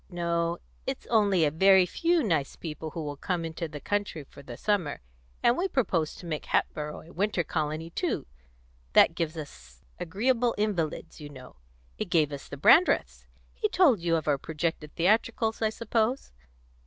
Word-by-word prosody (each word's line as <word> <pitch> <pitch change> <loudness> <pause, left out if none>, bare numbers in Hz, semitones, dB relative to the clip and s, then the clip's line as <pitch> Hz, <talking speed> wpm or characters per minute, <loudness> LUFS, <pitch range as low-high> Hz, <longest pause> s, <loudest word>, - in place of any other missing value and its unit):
No; 170 -1 -1 0.3
it's 265 0 -4
only 200 -7 +4
a 145 - +1
very 190 +3 +6
few 335 - +1
nice 160 -9 0
people 160 -1 -6
who 160 +1 -5
will 145 -1 -4
come 175 +2 -2
into 165 +1 -4
the 150 -1 -8
country 205 -4 -2
for 140 - -15
the 120 -3 -9
summer; 195 -9 0 0.4
and 240 - +5
we 365 +6 0
propose 185 - 0
to - - -11
make 155 -3 -4
Hatboro' 150 0 -1
a 170 - -15
winter 195 -1 0
colony 155 +1 -3
too; - - -2 0.7
that - - +6
gives 165 -1 -3
us 65 - -10 0.2
agreeable 230 +7 +1
invalids, 180 -7 -2
you 145 - -8
know; 130 - -13 0.4
it - - -1
gave 155 -3 +2
us 140 -1 -7
the 145 - -7
Brandreths. 335 - +4 0.3
He 430 - -1
told 345 - +4
you 170 0 +1
of 160 -2 -2
our 145 -2 +2
projected 160 0 -3
theatricals, 220 +5 +1
I 220 - +3
suppose?" 230 +3 -1
170 Hz, 170 wpm, -28 LUFS, 155-215 Hz, 0.7 s, very